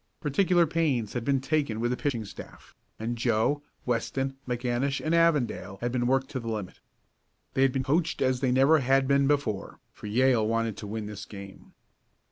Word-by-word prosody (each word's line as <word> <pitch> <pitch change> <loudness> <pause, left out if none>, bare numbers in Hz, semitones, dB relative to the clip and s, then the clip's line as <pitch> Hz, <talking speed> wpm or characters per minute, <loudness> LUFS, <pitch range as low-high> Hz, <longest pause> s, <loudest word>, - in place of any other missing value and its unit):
Particular 175 +3 +3
pains 145 -9 0
had 120 - -2
been 135 +1 +2
taken 135 -5 -1
with 120 +1 0
the - - +1
pitching 125 -5 -2
staff, - - -12 0.2
and 115 +2 -3
Joe, 120 +5 +1 0.2
Weston, 135 +3 -1
McAnish 125 +3 -1
and 155 - -1
Avondale 150 -12 +1
had 120 +2 -2
been 120 -1 0
worked 130 +1 +1
to 130 - -3
the 115 - -8
limit. 105 -5 -4 0.7
They 130 - +1
had 135 -1 +5
been 130 0 -1
coached 155 +5 0
as 130 -1 +1
they 130 -1 +1
never 135 +5 +5
had 135 0 +2
been 140 0 +3
before, 140 -9 -1
for - - -9
Yale 120 0 +3
wanted 115 -1 0
to 105 - -7
win 110 +1 -4
this 105 -1 -7
game. 100 -2 -11
130 Hz, 185 wpm, -28 LUFS, 115-140 Hz, 0.7 s, had